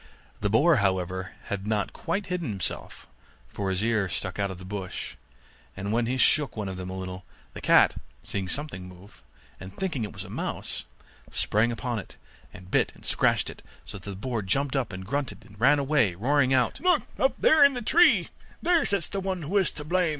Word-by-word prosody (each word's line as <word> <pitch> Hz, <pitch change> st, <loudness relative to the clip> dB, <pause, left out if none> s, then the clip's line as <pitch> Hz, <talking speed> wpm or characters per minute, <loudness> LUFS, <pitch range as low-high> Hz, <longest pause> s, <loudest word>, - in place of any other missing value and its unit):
The 105 Hz, -, 0 dB
boar, 140 Hz, +9 st, +5 dB
however, 95 Hz, -2 st, -1 dB
had 100 Hz, 0 st, -4 dB
not 105 Hz, -2 st, 0 dB
quite 200 Hz, +1 st, -2 dB
hidden 180 Hz, -6 st, -2 dB
himself, 100 Hz, -3 st, -5 dB, 0.4 s
for 100 Hz, -1 st, -3 dB
his 95 Hz, +2 st, 0 dB
ears 110 Hz, -5 st, +1 dB
stuck 95 Hz, 0 st, -3 dB
out 100 Hz, -1 st, +1 dB
of 95 Hz, -, -6 dB
the 95 Hz, -, -10 dB
bush; 95 Hz, -1 st, -5 dB, 0.6 s
and 100 Hz, +2 st, -3 dB
when 115 Hz, 0 st, +1 dB
he 130 Hz, +2 st, 0 dB
shook 140 Hz, -3 st, +3 dB
one 105 Hz, -2 st, -2 dB
of 95 Hz, -, -4 dB
them 90 Hz, 0 st, -6 dB
a 95 Hz, -, -5 dB
little, 95 Hz, 0 st, -6 dB, 0.3 s
the -, -, -8 dB
cat, -, -, +5 dB, 0.3 s
seeing 95 Hz, -2 st, -3 dB
something 110 Hz, -7 st, -4 dB
move, 90 Hz, +3 st, -15 dB, 0.4 s
and 95 Hz, 0 st, -10 dB
thinking 170 Hz, -11 st, -2 dB
it 105 Hz, -, -4 dB
was -, -, -6 dB
a -, -, -11 dB
mouse, -, -, -3 dB, 0.4 s
sprang 110 Hz, +3 st, +1 dB
upon 115 Hz, +1 st, -2 dB
it, -, -, -11 dB, 0.3 s
and 90 Hz, 0 st, -13 dB
bit -, -, +2 dB
and -, -, -14 dB
scratched -, -, +2 dB
it, -, -, -8 dB, 0.2 s
so 100 Hz, -, -8 dB
that 100 Hz, -, -9 dB
the 100 Hz, -, -5 dB
boar 115 Hz, +3 st, -2 dB
jumped 135 Hz, +9 st, 0 dB
up 130 Hz, -4 st, 0 dB
and 95 Hz, 0 st, -7 dB
grunted, 135 Hz, -1 st, -3 dB
and 105 Hz, -2 st, -16 dB
ran 140 Hz, +4 st, +6 dB
away, 135 Hz, -, +2 dB
roaring 130 Hz, +6 st, +2 dB
out, 125 Hz, -3 st, +2 dB
'Look 365 Hz, 0 st, +3 dB, 0.2 s
up -, -, +1 dB
in 285 Hz, -3 st, +7 dB
the 245 Hz, -, -3 dB
tree, 345 Hz, +10 st, +5 dB, 0.3 s
there 345 Hz, -3 st, +3 dB
sits 200 Hz, -4 st, 0 dB
the 195 Hz, -, -3 dB
one 190 Hz, -3 st, -3 dB
who 165 Hz, +8 st, -3 dB
is 190 Hz, -, +2 dB
to 150 Hz, -, -6 dB
blame. 175 Hz, +2 st, +1 dB
110 Hz, 210 wpm, -27 LUFS, 95-150 Hz, 0.6 s, in